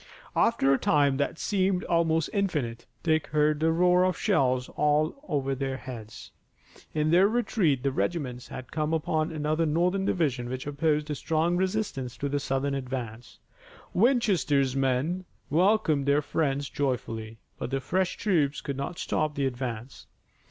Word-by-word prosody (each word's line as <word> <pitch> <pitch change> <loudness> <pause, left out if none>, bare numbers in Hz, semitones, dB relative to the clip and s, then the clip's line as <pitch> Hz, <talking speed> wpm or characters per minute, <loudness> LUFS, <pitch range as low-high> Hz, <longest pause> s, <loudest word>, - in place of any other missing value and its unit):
After 135 -13 +3
a 135 - +2
time 140 -2 +3
that 145 +3 -1
seemed 190 -1 0
almost 165 -1 +1
infinite, 150 - -1 0.2
Dick 155 -2 +1
heard 150 0 +2
the 160 +1 +3
roar 180 +2 +4
of 185 -2 +1
shells 125 -1 +1
over 150 - 0
their 135 0 -2
heads. 115 -5 -9 0.6
In 155 0 0
their 185 +3 +6
retreat 205 - +1
the 140 - +1
regiments 130 -4 -2
had 130 - -9
come 155 +1 0
upon 155 +1 0
another 155 +1 0
Northern 180 +5 +1
division 135 -10 0
which 130 0 -4
opposed 150 +1 0
a - - 0
strong 160 +4 0
resistance 185 - -2
to 140 - -2
the 145 +1 0
Southern 135 0 -1
advance. 125 -4 -5 0.6
Winchester's 185 - +2
men 135 +7 0 0.3
welcomed 165 -4 +3
their 145 +1 +3
friends 140 -2 -1
joyfully. 115 -6 -3 0.2
But - - -3
the 135 +1 -1
fresh 185 +6 -1
troops 155 -9 +1
could 140 -2 -5
not 140 +6 -4
stop 150 -1 -1
the 140 - 0
advance. 125 -1 -5
150 Hz, 150 wpm, -27 LUFS, 135-170 Hz, 0.6 s, their